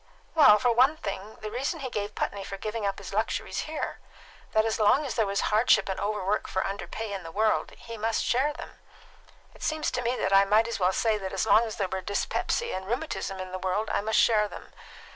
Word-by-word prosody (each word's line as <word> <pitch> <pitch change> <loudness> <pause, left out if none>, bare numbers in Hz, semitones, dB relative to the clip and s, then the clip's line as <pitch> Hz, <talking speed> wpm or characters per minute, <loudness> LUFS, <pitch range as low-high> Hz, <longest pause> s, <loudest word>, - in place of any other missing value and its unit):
Well, 215 -10 +7
for 240 +3 +2
one 260 +6 +4
thing, 200 -4 -6
the 215 -1 -5
reason 275 +7 -2
he 260 -2 -4
gave 205 0 -3
Putney 200 -1 -2
for 195 - -6
giving 215 +1 -3
up 195 - -2
his 200 0 -8
luxuries 220 +7 -2
here: 315 - -4 0.5
that 220 0 +3
as 225 0 -1
long 250 +8 +4
as 265 - -3
there 225 -3 +1
was 200 0 0
hardship 215 -1 +3
and 190 -1 -3
overwork 205 0 -1
for 190 - -1
underpay 200 +2 -5
in 195 - -4
the 165 -2 -9
world, 215 +4 +1
he 230 -1 -9
must 225 +1 0
share 265 +5 +2
them. 295 - -10 0.7
It - - -18
seems 310 -1 -1
to 250 - -2
me 245 +1 0
that 195 - +1
I 195 - +7
might 215 +3 +3
as 235 - -3
well 180 0 +3
say 215 +2 +1
that 190 -1 -5
as 195 +3 0
long 220 +1 +5
as 220 - -5
there 195 - -1
were 190 +1 -3
dyspepsia 205 - -1
and 190 0 -6
rheumatism 240 -5 -3
in 185 0 -6
the 185 - -4
world, 190 +4 -1
I - - +1
must 220 +1 0
share 215 -2 +4
them. - - -11
215 Hz, 235 wpm, -27 LUFS, 195-235 Hz, 0.7 s, Well